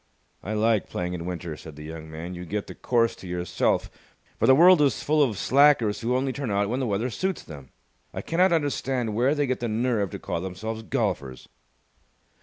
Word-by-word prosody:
"I 105 - -4
like 110 -1 +1
playing 90 0 -3
in 85 -1 -5
winter," 85 -3 -5
said 75 0 -11
the 75 - -10
young 80 0 -8
man. 80 +3 -7
"You 90 0 -7
get 100 +3 -3
the - - -9
course 115 -2 +1
to 95 - -10
yourself, 90 0 -1 0.5
for - - +3
the 130 - +7
world 175 +2 +7
is 140 -2 +2
full 155 +1 +2
of 120 -8 +2
slackers 130 -2 +4
who 120 +2 0
only 130 +1 0
turn 140 -3 -4
out 100 0 +1
when 125 +3 -1
the 130 - -1
weather 110 +4 -1
suits 190 - -2
them. 70 -5 -11 0.4
I - - -6
cannot 180 +3 +2
understand 135 -7 0
where 125 +7 +2
they 145 -1 +1
get 130 -1 -1
the 120 - -2
nerve 110 -2 0
to - - -6
call 85 - -4
themselves 110 +5 -5
golfers." 90 - -3
110 Hz, 210 wpm, -25 LUFS, 90-130 Hz, 0.5 s, the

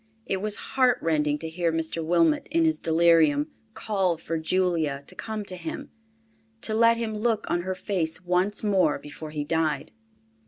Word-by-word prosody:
It 195 - -1
was 210 0 -1 0.2
heartrending 160 - +2
to 160 - -6
hear 165 +1 -1
Mr. 165 0 -2
Wilmot 165 -1 +2
in 330 +2 +2
his 320 0 +1
delirium, 160 -3 +3 0.2
call 190 -5 0
for 165 0 -3
Julia 160 -4 0
to - - -6
come 220 -2 -5
to 185 - -3
him—to 225 +5 -8
let 230 +1 +4
him 225 -2 -3
look 220 0 0
on 175 - 0
her 185 +1 -3
face 180 -4 -2
once 180 +4 +1
more 190 -7 +2
before 150 +1 -9
he 150 -1 -3
died. 155 -2 -1
175 Hz, 160 wpm, -26 LUFS, 160-215 Hz, 0.2 s, let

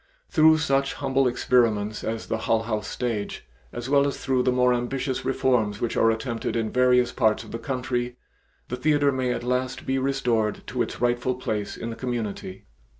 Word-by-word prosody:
Through 160 -1 +6
such 140 -3 +1
humble 135 -1 +1
experiments 115 -4 +1
as 110 0 -3
the 110 - -2
Hull 115 0 +1
House 110 -3 -3
stage, 115 -5 -3 0.3
as 120 - -6
well 140 +1 +4
as 140 - -3
through 130 -2 0
the 125 - +2
more 125 0 +3
ambitious 130 +2 -2
reforms 125 -6 +1
which 120 - -2
are 115 - +4
attempted 115 +1 -2
in 115 -2 -1
various 125 -1 +3
parts 110 -3 +1
of 110 - -12
the 115 - -4
country, 125 -1 -3 0.5
the 125 - -3
theatre 145 +1 +3
may 130 -2 -1
at 125 - -3
last 125 +1 -2
be 135 0 0
restored 125 -5 0
to 125 0 -3
its - - -3
rightful 120 +1 +1
place 110 -5 -3
in 115 - -5
the - - -6
community. 115 -6 -4
125 Hz, 185 wpm, -25 LUFS, 115-130 Hz, 0.5 s, Through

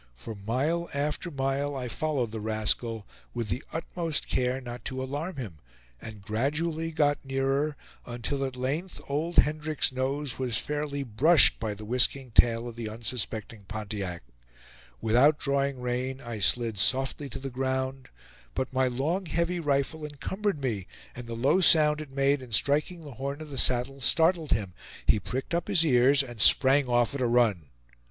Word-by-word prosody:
For 85 - -7
mile 130 +12 -1
after 150 +4 -2
mile 140 0 -1
I 125 -2 -3
followed 130 -2 -1
the 110 - -5
rascal, 110 +1 -1 0.3
with 115 -3 -3
the 125 - -2
utmost 165 -1 -2
care 125 +1 0
not 120 -2 -8
to 130 0 -3
alarm 145 +7 -4
him, 105 - -7 0.4
and 110 -3 -9
gradually 155 +9 -1
got 145 -2 +1
nearer, 135 +2 0 0.3
until 120 +3 -2
at 130 -1 -3
length 145 +9 -3
old 155 +5 -2
Hendrick's 155 -1 +2
nose 130 +1 -2
was 125 -4 -1
fairly 145 -1 -3
brushed 135 +7 +5
by 110 -2 -3
the 105 +1 -9
whisking 125 +2 +1
tail 115 +1 +4
of 120 - -8
the 115 -2 -5
unsuspecting 110 -1 -4
Pontiac. 100 - -5 0.8
Without 125 +7 +4
drawing 140 -2 0
rein, 125 +2 -2
I 120 -4 -6
slid 110 +1 +1
softly 135 +6 +1
to - - -6
the 135 0 -6
ground; 130 +1 -2 0.5
but 130 - -2
my 130 0 +2
long 155 +10 -1
heavy 170 +3 0
rifle 145 +1 0
encumbered 160 +5 -3
me, 105 -8 -2 0.3
and 125 -1 -8
the 115 - -5
low 135 +11 +3
sound 155 -3 +5
it 150 - -8
made 135 +1 +1
in 125 -2 -11
striking 150 +8 +1
the 145 - -9
horn 140 +2 -3
of 155 -2 -9
the 135 - -6
saddle 130 +2 +2
startled 165 +4 +3
him; 100 -5 0 0.3
he 110 - +4
pricked 130 +8 -4
up 170 0 0
his 185 -5 +2
ears, 135 0 +5
and 120 -5 -6
sprang 135 +5 +5
off 120 -1 +2
at 140 - -3
a 125 - +2
run. 110 - +2
135 Hz, 170 wpm, -28 LUFS, 120-150 Hz, 0.8 s, brushed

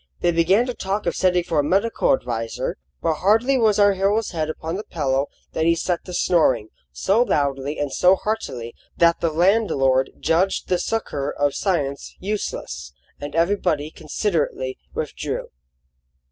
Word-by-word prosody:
They 175 - +3
began 180 +8 +3
to 250 - -3
talk 200 -1 -3
of 170 - 0
sending 180 -1 +2
for 165 -3 0
a - - +3
medical 195 +9 +1
adviser; 115 -3 -2 0.3
but 160 -2 +1
hardly 225 +8 +3
was 220 -5 +3
our 205 -1 +5
hero's 200 +3 +1
head 155 -3 -2
upon 160 +1 -4
the 205 - -4
pillow 140 -5 -1 0.3
than 160 - +1
he 170 - +4
set 175 +1 -2
to 180 - -8
snoring, 130 -14 +2 0.2
so 195 - +2
loudly 140 - 0
and 145 -2 -2
so 180 +1 +5
heartily 130 - -4 0.2
that 170 0 +4
the 170 - +2
landlord 155 -7 +2
judged 180 +4 +1
the 180 -1 +2
succour 145 -9 -2
of 145 -1 0
science 145 -8 -2
useless, 180 - -4 0.3
and 145 +1 -6
everybody 165 -4 +1
considerately 155 -6 -2 0.2
withdrew. - - -4
170 Hz, 155 wpm, -22 LUFS, 145-195 Hz, 0.3 s, our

